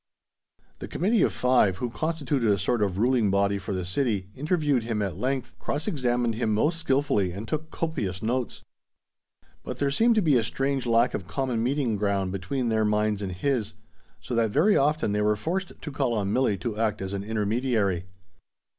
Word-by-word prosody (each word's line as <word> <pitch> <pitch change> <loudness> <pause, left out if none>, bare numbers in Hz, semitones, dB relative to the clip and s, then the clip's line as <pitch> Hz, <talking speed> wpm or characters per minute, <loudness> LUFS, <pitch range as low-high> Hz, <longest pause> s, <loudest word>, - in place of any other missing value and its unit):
The - - -6
Committee 210 +4 +1
of - - +3
Five, 125 -7 +3
who 120 +2 -3
constituted 145 -6 -1
a 100 - +3
sort 110 +5 0
of 95 -3 0
ruling 120 -1 +2
body 100 +1 +1
for 95 - -6
the 95 -2 -2
city, 100 -2 -1
interviewed 150 -3 +1
him 115 -1 -2
at 100 -5 -2
length, 130 +5 -2
cross 150 +2 -3
examined 120 -5 0
him 110 -1 0
most 160 +9 +1
skilfully 135 - +1
and 100 +5 -7
took 155 0 -3
copious 110 - -3
notes. 125 +2 -2 1.0
But - - -6
there 140 -1 0
seemed 230 +10 +3
to 215 - +4
be 150 -6 +4
a 115 - +2
strange 135 +1 -1
lack 115 +1 +3
of 90 - -4
common 125 +1 -1
meeting 125 -3 0
ground 100 -2 0
between 115 +7 -2
their 110 -1 +2
minds 105 -1 +1
and 95 -2 -3
his, 110 +2 -1 0.4
so 125 - -7
that 115 -1 +2
very 205 - +3
often 150 -5 +2
they 105 +1 0
were 105 0 +3
forced 175 - -3
to 150 - -7
call 135 -4 0
on 100 -1 -1
Milli 125 -7 +1
to 110 0 -3
act 110 -2 0
as 95 0 -4
an 100 0 -3
intermediary. 105 -3 0
115 Hz, 190 wpm, -26 LUFS, 100-140 Hz, 1.0 s, to